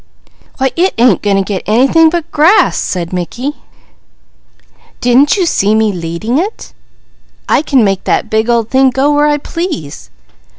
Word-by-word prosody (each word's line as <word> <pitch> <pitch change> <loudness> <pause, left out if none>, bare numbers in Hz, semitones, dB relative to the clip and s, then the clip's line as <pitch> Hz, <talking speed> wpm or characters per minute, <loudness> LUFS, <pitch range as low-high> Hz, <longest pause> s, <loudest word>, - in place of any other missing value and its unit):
"Why 265 -1 0
it 365 +3 0
ain't 235 -4 +3
going 205 -1 0
to 195 - +1
get 190 -1 -4
anything 270 +9 +3
but 340 0 -4
grass!" 320 +8 +3
said 175 -1 -3
Mickey. 230 - -4 1.5
"Didn't 255 +8 +3
you 370 - +1
see 210 - +1
me 220 -1 +1
leading 175 - -3
it? 405 +6 -5 0.7
I - - +2
can 275 -6 +1
make 195 -2 -1
that - - 0
big 220 +2 -1
old 230 -2 0
thing 265 0 +3
go 270 +3 0
where 295 0 +2
I 295 0 +1
please. 235 - -6
245 Hz, 160 wpm, -12 LUFS, 205-295 Hz, 1.5 s, ain't